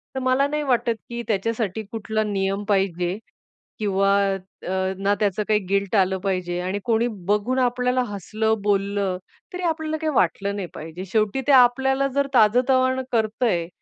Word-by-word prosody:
तर - - -1
मला 260 +2 +2
नाही 300 +1 -2
वाटत 240 -3 +1 0.2
की 235 0 -4
त्याच्यासाठी 220 0 -1
कुठला 220 -1 -2
नियम 195 -1 -1
पाहिजे 185 -2 0 0.6
किंवा 195 -1 +2 0.6
अ, 190 0 -1
ना 200 +1 +1
त्याचं 210 0 0
काही 210 -1 +3
गिल्ट 200 +1 0
आलं 190 -1 +3
पाहिजे 180 -2 -1
आणि 185 +3 -2
कोणी 230 0 +2 0.2
बघून 210 +6 +1
आपल्याला 250 0 +1
हसलं, 215 +3 -1
बोललं, 200 -2 0 0.4
तरी 360 0 -5
आपल्याला 315 -1 -2
काही 315 - 0
वाटलं 200 +2 +1
नाही 190 -3 -4
पाहिजे. 165 +4 -7
शेवटी 215 +4 +1
ते - - +5
आपल्याला 265 +2 +4
जर 280 0 +2
ताजतवाण 255 +3 +3
करतंय 220 -6 0
215 Hz, 150 wpm, -23 LUFS, 195-250 Hz, 0.6 s, ते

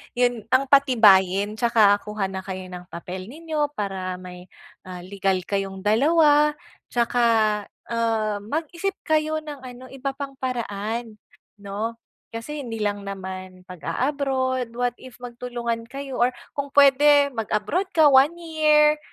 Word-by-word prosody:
'yun 245 -2 +1
ang 260 +1 +3
patibayin 210 -7 +5
tsaka 220 -4 +4
kuha 210 -2 -3
na 190 - -4
kayo 185 -1 -6
ng 180 0 -9
papel 185 +1 -7
ninyo 305 +2 -2
para 190 -3 -3
may, 180 0 -11 0.4
ah, 180 -1 -8
legal 195 0 -1
kayong 195 -1 -2
dalawa. 295 +6 +4 0.4
Tsaka, 240 0 +1 0.7
ah, 225 -2 0
mag-isip 330 - -3
kayo 310 0 +1
ng 295 -4 -9
ano, 250 0 -10
iba 270 +1 -4
pang 275 0 -7
paraan 230 -3 -4 0.4
'no, 210 +3 -5 0.4
kasi 295 +6 -5
hindi 225 -2 -5
lang 205 -1 -2
naman, 185 -1 -7
pag-a-abroad 260 - -2
what 245 0 -1
if 255 -2 -12
magtulungan 240 -1 -4
kayo 275 +1 -6
or 245 +1 +3 0.2
kung 280 0 -4
puwede 285 +1 +6
mag-abroad 225 - -1
ka 310 -2 +7
one 270 +4 +6
year 305 -2 +3
240 Hz, 130 wpm, -23 LUFS, 200-280 Hz, 0.7 s, ka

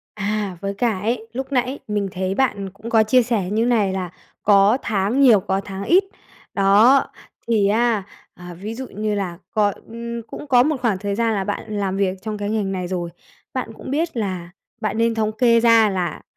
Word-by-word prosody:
À, 205 -2 -2
với 200 0 -3
cả 220 -2 0
ấy, 225 +2 -2
lúc 265 +3 -5
nãy 255 +1 0
mình 205 -2 -1
thấy 190 0 -2
bạn 200 -7 0
cũng 210 +4 -9
có 225 -1 +5
chia 245 +4 +4
sẻ 220 -6 -1
như 220 +2 +1
này 215 -6 +2
là 185 -2 -3 0.3
có 200 +3 +5
tháng 210 +5 0
nhiều, 235 -7 +7
có 190 0 -1
tháng 195 0 -7
ít. 370 +3 +4 0.5
Đó, 210 +7 +5 0.4
thì 210 -4 +2
á 225 -1 +2 0.3
à, 175 0 -10
ví 205 +6 -6
dụ 260 +2 -6
như 210 +1 -3
là 185 -4 -3
cọi, 205 -2 +1
ừm, 235 0 -6
cũng 265 - -9
có 245 -3 +5
một 305 +2 +1
khoảng 220 -6 +1
thời 200 0 -3
gian 230 0 +1
là 195 -1 -1
bạn 210 +1 -4
làm 195 -1 -1
việc 195 -1 0
trong 215 -1 -4
cái 205 0 -3
ngành 205 -3 -1
này 180 -1 -3
rồi, 175 -2 -3 0.4
bạn 255 -3 -3
cũng - - -8
biết 315 +1 -1
là 185 -6 -3 0.3
bạn 215 0 -2
nên 230 0 +2
thống 215 -1 0
kê 230 0 +4
ra 230 -2 +5
là 185 -3 -3
215 Hz, 210 wpm, -21 LUFS, 195-235 Hz, 0.5 s, nhiều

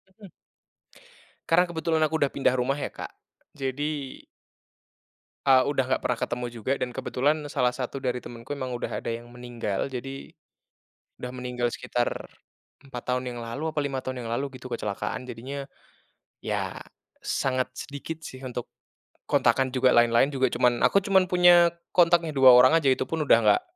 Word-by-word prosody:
Mhm. 205 -1 -13 1.2
Karena, 175 +2 +5
kebetulan 160 -1 -1
aku 155 +1 -1
udah 140 -2 +2
pindah 135 -2 +1
rumah 130 +2 0
ya, 145 - -4
Kak. - - -8 0.4
Jadi 140 +1 -4 1.3
eee, 130 -2 +6
udah 140 -2 +1
nggak - - -1
pernah 125 - -1
ketemu 120 +1 -3
juga 115 +1 -4
dan 125 - -1
kebetulan 145 +5 0
salah 125 0 +1
satu 135 +1 -5
dari 125 -1 -1
temenku 120 +4 -7
emang 130 -2 -4
udah 120 - -4
ada - - -3
yang 120 +1 -8
meninggal. 120 -5 -4
Jadi, 135 +2 -7 0.9
udah 125 - -6
meninggal 125 -1 -2
sekitar 120 0 -2 0.5
4 130 -3 -8
tahun 125 0 -2
yang - - -7
lalu, 140 +8 -4
apa 155 - -2
5 135 -2 -2
tahun 130 -1 -5
yang - - -5
lalu, 135 +2 -3
gitu, 125 - -10
kecelakaan. 115 +1 -4
Jadinya, 135 +4 -6 0.8
ya, - - -2 0.4
sangat 130 -1 -1
sedikit 145 +4 -7
sih, 130 - -9
untuk, 125 -2 -5 0.6
kontakan 130 0 +3
juga 130 0 +3
lain-lain 120 +4 +4
juga 130 -1 +2
cuman 120 -1 +1
aku 200 0 +3
cuman 190 -2 +3
punya 175 -1 +6 0.2
kontaknya, 170 -2 +4
2 135 -2 +7
orang 125 +3 +8
aja, 140 - +3
itupun 130 +5 0
udah - - +8
nggak 105 - +5
130 Hz, 160 wpm, -26 LUFS, 125-145 Hz, 1.3 s, orang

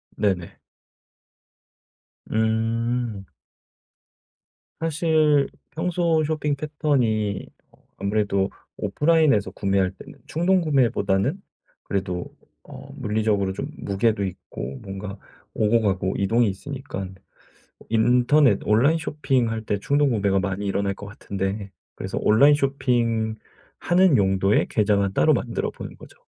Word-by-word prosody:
네네. 95 -5 -1 1.7
음. 115 -1 0 1.5
사실 155 -3 +2 0.2
평소 165 -1 +1
쇼핑 150 -2 -1
패턴이 125 -9 0 0.3
어 - - -25 0.2
아무래도 100 -1 0 0.3
오프라인에서 145 +1 +2
구매할 95 -2 0
때는 95 - -14
충동구매보다는 150 - +1 0.4
그래도 90 -3 -3 0.4
어 - - -11
물리적으로 105 -2 0
좀 135 +8 -4
무게도 100 +1 0
있고 85 -8 -7
뭔가 100 0 -7 0.4
오고 110 +2 +2
가고 95 -2 0
이동이 110 +3 +2
있으니깐 100 -4 -6 0.7
인터넷 125 +5 +4
온라인 125 +10 +4
쇼핑할 130 -8 -1
때 100 -1 -1
충동구매가 115 -8 +2
많이 95 +1 -3
일어날 100 0 0
것 105 - -10
같은데 100 0 -4 0.2
그래서 - - -5
온라인 140 +7 +6
쇼핑하는 125 - 0
용도의 95 +1 +2
계좌만 100 -2 +1
따로 75 - +4
만들어 - - -2
보는 - - -9
거죠. - - -15
110 Hz, 255 characters per minute, -23 LUFS, 100-140 Hz, 1.7 s, 온라인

